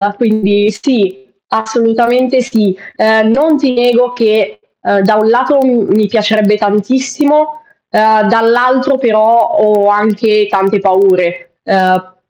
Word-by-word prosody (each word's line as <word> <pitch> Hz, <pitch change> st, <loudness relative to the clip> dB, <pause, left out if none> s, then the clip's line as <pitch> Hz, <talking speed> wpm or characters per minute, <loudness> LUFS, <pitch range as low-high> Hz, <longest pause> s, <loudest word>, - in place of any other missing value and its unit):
quindi 210 Hz, -2 st, 0 dB
sì. 195 Hz, -5 st, -3 dB, 0.2 s
Assolutamente 240 Hz, +3 st, 0 dB
sì. 210 Hz, -6 st, -1 dB, 0.2 s
Uhm, 220 Hz, 0 st, +2 dB
non 300 Hz, +5 st, +2 dB
ti 275 Hz, -3 st, -1 dB
nego 245 Hz, 0 st, +1 dB
che, 230 Hz, -, -1 dB, 0.2 s
uhm, 200 Hz, -, 0 dB
da 215 Hz, +2 st, +2 dB
un 215 Hz, +1 st, +1 dB
lato 255 Hz, +4 st, +1 dB
m 240 Hz, -5 st, +1 dB
mi 215 Hz, -1 st, +1 dB
piacerebbe 210 Hz, -1 st, 0 dB
tantissimo, 275 Hz, +9 st, -1 dB, 0.3 s
ehm, 215 Hz, 0 st, +2 dB
dall'altro 245 Hz, +4 st, +1 dB
però 230 Hz, -2 st, +2 dB
ho 210 Hz, -3 st, +2 dB
anche 210 Hz, 0 st, +1 dB
tante 195 Hz, +1 st, 0 dB
paure, 185 Hz, -3 st, 0 dB
uhm, 185 Hz, -1 st, -1 dB
220 Hz, 120 wpm, -11 LUFS, 205-245 Hz, 0.3 s, Uhm